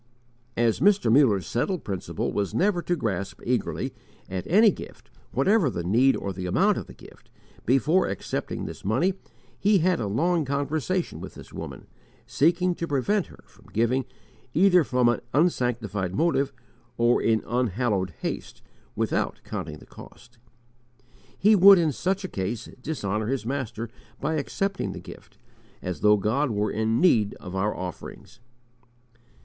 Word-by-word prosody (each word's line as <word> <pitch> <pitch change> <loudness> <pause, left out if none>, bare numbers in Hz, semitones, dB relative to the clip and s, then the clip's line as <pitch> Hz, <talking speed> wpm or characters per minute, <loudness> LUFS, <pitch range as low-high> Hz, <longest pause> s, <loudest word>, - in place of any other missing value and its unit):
As 115 -2 +2
Mr. 200 - +4
Muller's 115 - +4
settled 155 - -1
principle 95 -3 -3
was 100 -1 -2
never 190 -2 +2
to 175 - 0
grasp 100 - -3
eagerly 125 +1 -1 0.3
at 95 -1 -5
any 210 +5 +6
gift - - -11 0.2
whatever 200 -7 +3
the 85 -7 -4
need 120 +9 +4
or 100 - -4
the 90 0 -5
amount 90 - +2
of - - -8
the - - -13
gift, - - -17 0.4
before 145 +9 +3
accepting 100 - -4
this - - -8
money 130 - +1 0.5
he 205 0 +4
had 180 0 +2
a 105 - -2
long 165 - +1
conversation 145 +6 -2
with - - -9
this - - -12
woman, - - -7 0.4
seeking 175 +4 +2
to 170 -1 -4
prevent 165 +8 0
her - - -16
from - - -22
giving 120 +4 +1 0.5
either 180 0 +5
from 125 -3 +2
an 120 - +1
unsanctified 120 - 0
motive 140 -1 +1 0.5
or 120 +1 +3
in 110 -1 +2
unhallowed 110 -6 -1
haste, - - -5 0.3
without - - -1
counting 75 -1 -5
the - - -15
cost. 120 0 -15 1.0
He 215 +3 +5
would 195 0 +9
in 165 -3 +2
such 190 +8 -1
a - - -2
case 105 - -4
dishonour 110 -8 -2
his 130 -3 -2
Master 120 -3 -3 0.3
by 150 +3 -1
accepting 195 +6 -2
the - - -7
gift, - - -13 0.4
as 90 -4 -5
though 105 0 +5
God 125 +9 0
were 105 -2 -1
in 110 +1 0
need 115 - +3
of 95 -1 -9
our 100 +2 0
offerings. 90 +5 -8
125 Hz, 155 wpm, -26 LUFS, 105-170 Hz, 1.0 s, would